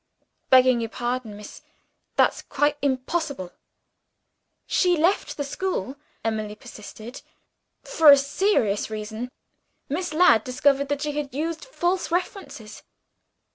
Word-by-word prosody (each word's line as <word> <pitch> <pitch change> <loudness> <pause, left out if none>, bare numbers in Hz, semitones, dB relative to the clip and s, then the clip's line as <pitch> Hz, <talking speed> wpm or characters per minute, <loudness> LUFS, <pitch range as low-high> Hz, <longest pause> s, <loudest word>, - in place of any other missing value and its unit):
"Begging 255 -2 +5
your 225 - -3
pardon, 240 -3 -4
miss, 210 - -11 0.5
that's - - +3
quite 290 +1 0
impossible!" 275 - -2 1.1
"She 360 -2 +2
left 345 +6 +1
the 290 - -1
school," 280 - -3 0.3
Emily 215 -1 -2
persisted, 215 +3 -11 0.6
"for 315 -2 +5
a 280 - +10
serious 275 - +1
reason. 220 +3 -5 0.6
Miss 350 +5 -2
Ladd 305 -9 +5
discovered 275 +2 +1
that 290 0 -1
she 300 - -1
had 290 -2 -5
used 325 - -3
false 370 -7 -1
references." 310 - -4
275 Hz, 115 wpm, -24 LUFS, 225-320 Hz, 1.1 s, a